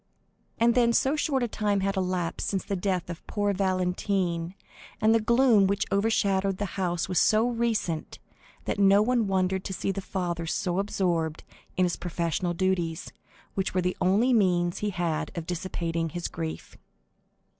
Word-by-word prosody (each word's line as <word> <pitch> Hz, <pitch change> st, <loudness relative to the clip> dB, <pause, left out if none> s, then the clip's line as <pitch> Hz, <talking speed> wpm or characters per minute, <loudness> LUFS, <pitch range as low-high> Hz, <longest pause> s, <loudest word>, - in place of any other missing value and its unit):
And 235 Hz, +1 st, +4 dB
then 235 Hz, -1 st, +3 dB
so 270 Hz, +5 st, +2 dB
short 285 Hz, -3 st, 0 dB
a -, -, +1 dB
time 205 Hz, -2 st, 0 dB
had 195 Hz, +1 st, 0 dB
elapsed 185 Hz, -2 st, -2 dB
since 195 Hz, -2 st, -2 dB
the 200 Hz, -, -2 dB
death 185 Hz, -2 st, -1 dB
of 170 Hz, -1 st, -8 dB
poor 205 Hz, -1 st, 0 dB
Valentine, 185 Hz, -2 st, -1 dB, 0.4 s
and 220 Hz, +1 st, +4 dB
the 225 Hz, -, +4 dB
gloom 235 Hz, -3 st, +4 dB
which 200 Hz, +1 st, 0 dB
overshadowed 195 Hz, -2 st, +1 dB
the 205 Hz, -, -2 dB
house 175 Hz, -3 st, -1 dB
was 180 Hz, -3 st, +2 dB
so 220 Hz, +2 st, +4 dB
recent, 230 Hz, -9 st, -1 dB, 0.5 s
that -, -, -2 dB
no 200 Hz, +1 st, +6 dB
one 240 Hz, -2 st, +1 dB
wondered 190 Hz, 0 st, 0 dB
to 190 Hz, -, -3 dB
see 190 Hz, -, -1 dB
the 195 Hz, -, -4 dB
father 175 Hz, -3 st, -3 dB
so 175 Hz, +2 st, -1 dB
absorbed 170 Hz, -6 st, -1 dB, 0.3 s
in 185 Hz, -, +4 dB
his 175 Hz, -, -1 dB
professional 175 Hz, 0 st, -2 dB
duties, 175 Hz, -3 st, -1 dB, 0.4 s
which 190 Hz, -1 st, -2 dB
were 185 Hz, -, +3 dB
the 180 Hz, +1 st, -1 dB
only 210 Hz, +8 st, +3 dB
means 175 Hz, -5 st, +2 dB
he 210 Hz, -, -1 dB
had 175 Hz, -5 st, -2 dB
of 165 Hz, -, -3 dB
dissipating 170 Hz, -2 st, -2 dB
his 175 Hz, +2 st, -4 dB
grief. 160 Hz, -1 st, -6 dB
190 Hz, 165 wpm, -27 LUFS, 175-205 Hz, 0.5 s, no